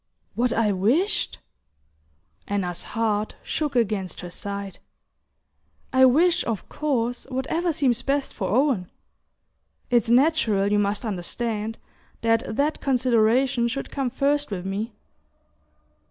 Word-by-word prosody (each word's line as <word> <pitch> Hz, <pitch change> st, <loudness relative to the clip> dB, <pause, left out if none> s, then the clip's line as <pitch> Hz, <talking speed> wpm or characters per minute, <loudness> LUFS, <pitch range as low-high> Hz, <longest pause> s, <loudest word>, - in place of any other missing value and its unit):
"What 245 Hz, +1 st, +1 dB
I 225 Hz, -3 st, +2 dB
wished?" 240 Hz, -, +1 dB, 1.1 s
Anna's 180 Hz, -4 st, -2 dB, 0.2 s
heart 215 Hz, -2 st, 0 dB
shook 295 Hz, -4 st, -2 dB
against 210 Hz, -5 st, 0 dB
her 175 Hz, -1 st, -8 dB
side. 200 Hz, 0 st, -5 dB, 1.1 s
"I 260 Hz, 0 st, +7 dB
wish, 330 Hz, +7 st, +4 dB
of 225 Hz, -4 st, -3 dB
course, 245 Hz, -5 st, -1 dB
whatever 320 Hz, +7 st, -1 dB
seems 260 Hz, -6 st, +1 dB
best 275 Hz, +2 st, -1 dB
for 190 Hz, -5 st, -3 dB
Owen... 240 Hz, -6 st, +2 dB, 1.0 s
It's 235 Hz, -2 st, +3 dB
natural, 235 Hz, -7 st, +3 dB
you 210 Hz, -, +3 dB
must 205 Hz, +3 st, 0 dB
understand, 220 Hz, +3 st, -3 dB, 0.4 s
that 225 Hz, -1 st, +1 dB
that 295 Hz, +4 st, 0 dB
consideration 245 Hz, -1 st, +2 dB
should 265 Hz, +3 st, -4 dB
come 270 Hz, -3 st, -1 dB
first 285 Hz, +3 st, 0 dB
with 185 Hz, -3 st, -4 dB
me..." 205 Hz, +4 st, -3 dB
235 Hz, 115 wpm, -24 LUFS, 205-270 Hz, 1.1 s, I